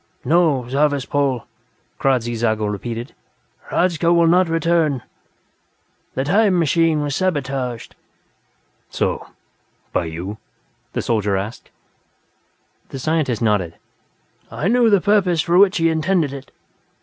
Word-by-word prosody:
"No, 150 -4 +2
Zarvas 140 0 +1
Pol," 140 -5 -1 0.5
Kradzy 125 -3 +1
Zago 110 -2 0
repeated. 115 +4 -5 0.6
"Hradzka 170 -2 +1
will 170 -1 +4
not 180 +1 +3
return; 165 -5 +1 1.1
the 130 - 0
'time 195 +5 +3
machine' 165 -1 +2
was 145 -1 -2
sabotaged." 135 -9 -2 1.0
"So? - - -2 0.7
By - - 0
you?" 85 +6 -6 0.5
the - - -2
soldier 105 -4 0
asked. 105 +5 -6 1.2
The - - -7
scientist 135 -5 -1
nodded. 100 -7 0 0.7
"I 155 - -3
knew 240 0 +4
the 200 -3 +4
purpose 190 -5 +2
for 175 +1 +3
which 200 0 +5
he 165 -1 +2
intended 160 -2 0
it. 135 -1 -9
145 Hz, 115 wpm, -20 LUFS, 120-170 Hz, 1.2 s, which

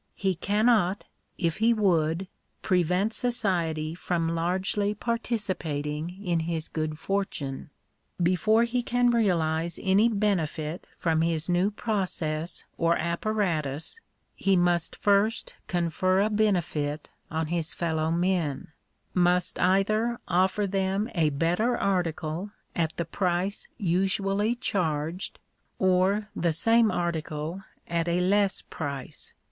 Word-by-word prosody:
He 190 -1 0
cannot, 205 +1 +2 0.3
if 165 -4 0
he 230 +2 +3
would, 175 -3 +1 0.4
prevent 180 +4 +2
society 170 -11 0
from 170 -1 -1
largely 190 +5 0
participating 185 -7 -3
in 170 -2 +1
his 160 -1 -2
good 155 -1 -3
fortune. 160 -8 -3 0.5
Before 185 +6 +3
he 240 +1 0
can 245 0 +2
realize 170 -7 +1
any 200 +4 +4
benefit 175 -6 -1
from 160 -2 +1
his 165 -1 0
new 180 +3 +3
process 180 -7 -2
or 165 0 +3
apparatus, 170 - -1 0.4
he 195 0 +2
must 175 -2 +1
first 205 +2 +1
confer 185 +2 +1
a 215 +2 +1
benefit 175 -8 0 0.2
on 160 0 -1
his 165 -2 0
fellow 160 -2 -1
men 170 -2 0 0.2
— - - -46 0.2
must 180 0 +2
either 215 +6 +2
offer 185 +3 +2
them 195 +3 -1
a 160 -3 +2
better 175 - +1
article 175 -1 -1 0.3
at 165 -2 +1
the 170 - -1
price 180 +3 -1
usually 195 +4 +1
charged, 170 -6 -2 0.4
or 190 +3 +2
the 170 -1 +1
same 225 +7 +4
article 165 -1 -2 0.3
at 170 0 -1
a 170 +1 +1
less 195 +2 +2
price. 140 -4 -6
180 Hz, 115 wpm, -27 LUFS, 165-205 Hz, 0.5 s, any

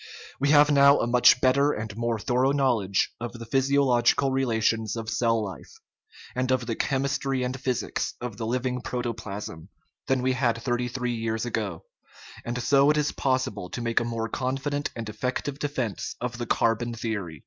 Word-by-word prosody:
We 140 +1 +1
have 150 0 +6
now 140 0 +6
a - - +1
much 125 +1 +5
better 140 +3 +3
and 110 -1 -5
more 115 0 -1
thorough 125 +5 +1
knowledge 120 -9 +1
of 120 0 -5
the 115 -1 -8
physiological 135 0 +2
relations 115 -4 0
of 115 -1 -4
cell 115 -2 +1
life, 95 -2 -9 0.6
and 125 0 -1
of 130 -2 +1
the 115 -1 -2
chemistry 135 0 -1
and 125 +1 -3
physics 130 -2 -2
of 120 -4 -6
the 110 -1 -3
living 125 +1 -1
proto 120 -1 -3
plasm, 100 -7 -7 0.4
than 130 -1 +1
we 130 0 +2
had 120 -3 +1
thirty 120 0 -1
three 125 0 -2
years 115 0 -2
ago, 105 -7 -3 0.6
and 120 +1 -3
so 140 +2 +4
it 150 - +3
is 150 -1 +1
possible 130 -8 -1
to - - -5
make 115 -1 +1
a - - -1
more 115 -1 -2
confident 135 +4 -2
and 115 -2 -5
effective 125 +6 -3
defence 130 -8 -3
of 125 -1 -4
the 120 - -3
carbon 115 +1 +1
theory. 100 -9 -4
120 Hz, 180 wpm, -26 LUFS, 115-135 Hz, 0.6 s, have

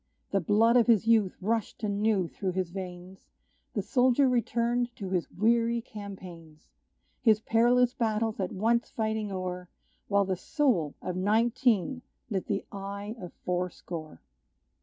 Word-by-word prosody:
The 195 - +2
blood 225 +7 +4
of 240 - +4
his 225 -3 +4
youth 220 -5 +3
rushed 220 +2 -2
anew 205 -2 +1
through 185 +2 -4
his 185 -2 -2
veins; 185 0 -8 0.5
The - - 0
soldier 255 +1 +3
returned 240 0 0
to 190 -3 -6
his 180 -3 -1
weary 230 +3 +2
campaigns; 185 -8 -10 0.5
His 220 -3 +5
perilous 240 +2 +3
battles 220 -2 -1
at 185 -2 -1
once 230 +4 +1
fighting 220 -2 -2
o'er, 180 -1 -4 0.4
While 200 -1 +3
the 190 -1 -1
soul 190 - 0
of 180 - -3
nineteen 230 +4 +2 0.3
lit 190 -3 -2
the 200 -1 -1
eye 200 +2 -6
of 180 - -7
four 180 0 0
score. 160 -3 -8
210 Hz, 140 wpm, -29 LUFS, 185-230 Hz, 0.5 s, His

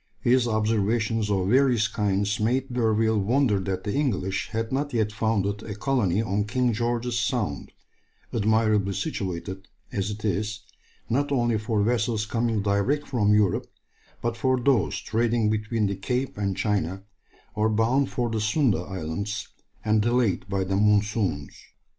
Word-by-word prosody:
His 125 0 +3
observations 110 0 +1
of 95 -2 +1
various 125 -3 +4
kinds 105 -1 0
made 125 +4 0
D'Urville 110 -2 +2
wonder 115 0 +2
that 95 -1 -3
the 105 - -2
English 110 -10 -1
had 115 0 -3
not 145 +1 -1
yet 110 -2 +1
founded 105 -1 0
a 105 -2 -6
colony 110 -5 +1
on 105 -1 0
King 125 +2 +1
George's 120 +1 -1
Sound, 110 - -2 0.6
admirably 110 -2 +2
situated 95 - -4 0.2
as 100 0 -2
it 105 +1 -6
is, 105 +1 -1 0.5
not 145 +4 0
only 120 -5 +1
for 110 -1 0
vessels 115 -1 0
coming 115 -2 0
direct 100 +9 0
from 105 -5 +2
Europe, 105 -4 +2 0.6
but 120 -1 0
for 130 +2 +1
those 125 -3 +2
trading 115 0 +1
between 110 0 0
the 100 0 -1
Cape 125 +7 -2
and 100 -2 -2
China, 100 -3 -1 0.5
or 110 +1 +1
bound 115 +6 +2
for 120 -1 -1
the 110 -1 -1
Sunda 115 +1 +2
Islands, 95 +3 -4 0.4
and 110 0 +3
delayed 110 -5 +1
by 95 -1 0
the 95 +1 -1
monsoons. 105 -7 +1
110 Hz, 145 wpm, -25 LUFS, 100-120 Hz, 0.6 s, various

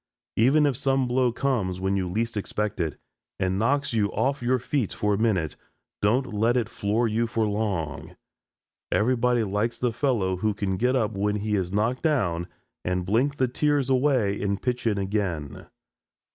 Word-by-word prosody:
Even 135 +7 +4
if 140 -3 +2
some 135 0 +1
blow 125 0 +2
comes 115 -8 -1
when 95 +1 0
you 95 -2 -1
least 115 +5 -2
expect 105 0 -2
it, 80 -3 -2 0.4
and 95 0 0
knocks 140 +4 +1
you 105 -3 +1
off 135 +1 0
your 125 +2 +2
feet 125 -2 -1
for 105 0 0
a - - +1
minute, 95 -9 +1 0.5
don't 120 +4 +1
let 115 +4 +2
it 115 -3 0
floor 115 +1 0
you 115 +2 0
long. 105 -8 -1 0.8
Everybody 125 +1 +2
likes 105 +3 -1
the 125 -2 0
fellow 110 -8 0
who 105 +2 0
can 100 -2 -1
get 125 +5 +2
up 110 -4 +1
when 105 0 0
he 105 0 -1
is 95 -3 -1
knocked 110 +6 0
down 90 - 0 0.4
and 90 0 -1
blink 125 +9 +1
the 130 - +2
tears 140 +1 +1
away 125 -7 +2
and 100 -1 -1
pitch 125 -2 -1
in 105 -2 +1
again. 95 -7 -3
110 Hz, 175 wpm, -26 LUFS, 100-125 Hz, 0.8 s, Even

